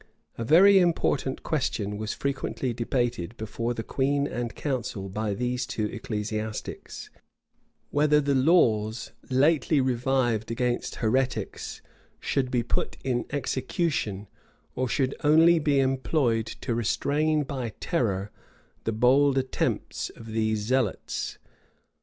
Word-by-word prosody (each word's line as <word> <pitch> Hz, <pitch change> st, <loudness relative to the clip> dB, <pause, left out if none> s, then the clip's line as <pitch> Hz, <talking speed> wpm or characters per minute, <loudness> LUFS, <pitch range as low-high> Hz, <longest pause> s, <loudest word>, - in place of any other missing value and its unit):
A 115 Hz, -, -4 dB
very 190 Hz, -, +7 dB
important 160 Hz, -6 st, +1 dB
question 110 Hz, -9 st, -1 dB
was 105 Hz, +1 st, -3 dB
frequently 135 Hz, -2 st, -2 dB
debated 115 Hz, -4 st, -2 dB
before 115 Hz, +2 st, -3 dB
the 115 Hz, -, -4 dB
queen 140 Hz, +3 st, 0 dB
and 120 Hz, -4 st, -4 dB
council 120 Hz, -8 st, -3 dB
by 105 Hz, +1 st, -2 dB
these 125 Hz, +2 st, -2 dB
two 110 Hz, -, -2 dB
ecclesiastics; 110 Hz, -2 st, -5 dB, 0.8 s
whether 150 Hz, +1 st, +4 dB
the 140 Hz, -1 st, +1 dB
laws 120 Hz, -7 st, +2 dB, 0.2 s
lately 145 Hz, +2 st, +3 dB
revived 125 Hz, -3 st, +1 dB
against 120 Hz, +1 st, -1 dB
heretics 125 Hz, +3 st, -1 dB, 0.4 s
should 130 Hz, -2 st, -1 dB
be 125 Hz, -2 st, +1 dB
put 120 Hz, -, -2 dB
in 125 Hz, -2 st, -1 dB
execution, 130 Hz, -, -2 dB, 0.5 s
or 130 Hz, -, -1 dB
should 135 Hz, 0 st, +1 dB
only 160 Hz, +3 st, +6 dB
be 145 Hz, -2 st, +2 dB
employed 130 Hz, -3 st, +1 dB
to 120 Hz, -, -1 dB
restrain 150 Hz, +7 st, +1 dB
by 130 Hz, -6 st, -4 dB
terror 105 Hz, -, -1 dB, 0.5 s
the 115 Hz, -, +1 dB
bold 130 Hz, +5 st, +4 dB
attempts 130 Hz, -1 st, -1 dB
of 115 Hz, -1 st, -10 dB
these 110 Hz, -1 st, 0 dB
zealots. 120 Hz, -1 st, -1 dB
125 Hz, 115 wpm, -27 LUFS, 110-140 Hz, 0.8 s, very